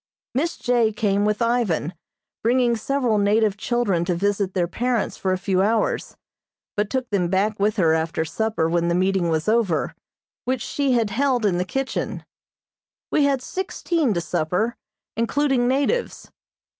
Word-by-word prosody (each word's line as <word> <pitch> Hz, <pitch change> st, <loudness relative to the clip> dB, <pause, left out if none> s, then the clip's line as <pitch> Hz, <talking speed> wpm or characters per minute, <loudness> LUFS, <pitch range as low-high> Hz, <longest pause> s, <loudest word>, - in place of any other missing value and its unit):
Miss 310 Hz, +7 st, -1 dB
J. 240 Hz, -3 st, +2 dB
came 205 Hz, -2 st, +1 dB
with 210 Hz, +2 st, +1 dB
Ivan, 225 Hz, -9 st, 0 dB, 0.5 s
bringing 240 Hz, +1 st, +2 dB
several 240 Hz, -1 st, 0 dB
native 205 Hz, 0 st, +2 dB
children 210 Hz, -5 st, 0 dB
to 175 Hz, -, 0 dB
visit 200 Hz, +1 st, 0 dB
their 175 Hz, -2 st, +1 dB
parents 240 Hz, +4 st, -1 dB
for 190 Hz, -, -1 dB
a 185 Hz, -, +1 dB
few 185 Hz, 0 st, 0 dB
hours, 215 Hz, +2 st, 0 dB, 0.6 s
but 210 Hz, -1 st, 0 dB
took 260 Hz, -2 st, -2 dB
them 185 Hz, -4 st, +1 dB
back 200 Hz, +4 st, 0 dB
with 210 Hz, +1 st, +2 dB
her 165 Hz, -4 st, +4 dB
after 160 Hz, 0 st, -1 dB
supper 210 Hz, +1 st, -1 dB
when 170 Hz, 0 st, +1 dB
the 170 Hz, -, +1 dB
meeting 185 Hz, -1 st, +1 dB
was 160 Hz, +1 st, -1 dB
over, 190 Hz, -8 st, +1 dB, 0.5 s
which 255 Hz, -1 st, -1 dB
she 280 Hz, -2 st, 0 dB
had 230 Hz, -4 st, +1 dB
held 255 Hz, 0 st, +1 dB
in 180 Hz, -4 st, +2 dB
the 180 Hz, -, 0 dB
kitchen. 270 Hz, +7 st, -3 dB, 0.9 s
We 295 Hz, -, +3 dB
had 275 Hz, -3 st, +1 dB
sixteen 340 Hz, -6 st, -1 dB
to 170 Hz, -, 0 dB
supper, 180 Hz, +8 st, -1 dB, 0.4 s
including 250 Hz, +2 st, +1 dB
natives. 285 Hz, -, -1 dB
215 Hz, 155 wpm, -23 LUFS, 185-245 Hz, 0.9 s, her